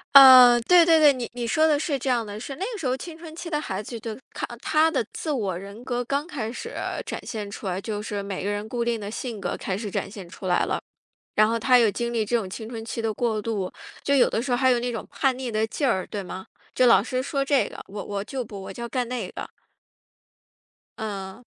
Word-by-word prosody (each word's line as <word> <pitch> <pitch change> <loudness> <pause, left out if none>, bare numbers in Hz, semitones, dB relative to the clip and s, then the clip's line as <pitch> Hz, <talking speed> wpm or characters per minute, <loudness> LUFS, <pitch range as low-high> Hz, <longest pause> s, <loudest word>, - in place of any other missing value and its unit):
呃， 255 -3 +11
对 350 +8 +6
对 325 -1 +6
对， 295 -2 +7
你 250 -3 -5
你 240 -1 -3
说 310 +8 +3
的 300 -2 +3
是 295 -2 -1
这 265 - -2
样 240 -3 +1
的， 205 0 -7
是 270 +4 -6
那 375 - -3
个 - - -5
时 280 - -2
候 255 - 0
青 330 +4 -8
春 325 -1 -10
期 340 - -7
的 300 -3 -1
孩 190 -8 -3
子 230 +2 -7
都 220 -1 -6 0.2
看 - - -3
他 315 +5 +3
的 265 -8 0
自 315 - -3
我 205 -10 -1
人 200 +5 -9
格 245 -1 -1
刚 280 +4 -1
开 255 -10 -4
始 - - -7 0.3
展 - - -5
现 210 -3 -5
出 200 0 -7
来， 185 0 -1
就 210 0 -4
是 205 -2 -4
每 195 -2 -4
个 200 - -1
人 205 +1 -3
固 235 +1 -2
定 235 -1 0
的 205 0 -6
性 230 -1 -5
格， - - -2
开 190 - -3
始 210 -1 -5
展 - - -2
现 195 -3 -9
出 185 +2 -8
来 180 - +3
了。 - - -2 0.5
然 215 0 +5
后 230 +1 0
他 250 +2 +5
又 230 -3 +5
经 235 +3 -3
历 225 -2 +1
这 240 +3 +1
种 215 -5 -2
青 220 +4 -7
春 225 -1 -6
期 230 0 -4
的 225 -1 0
过 220 -1 -1
渡， 205 -4 -2 0.3
就 280 - +2
有 270 - +5
的 - - 0
时 250 +1 -2
候 - - +4
还 260 +1 +4
有 245 - +4
那 245 +1 -2
种 225 - -4
叛 265 -2 +1
逆 255 -2 -4
的 220 0 +1
劲 275 +5 -1
儿， 190 -6 0
对 205 - -5
吗？ 190 0 -7 0.3
就 255 - +4
老 235 - +7
师 255 +3 -2
说 275 0 -1
这 275 -1 +3
个， - - -10
我 205 +1 -6
我 200 -1 -3
就 255 +4 -4
不， 205 -3 -9
我 195 - -7
就 235 - -8
要 - - -4
干 250 -1 -2
那 240 -6 -3
个。 - - -7 1.5
嗯。 200 0 -5
235 Hz, 285 characters per minute, -25 LUFS, 205-260 Hz, 1.5 s, 呃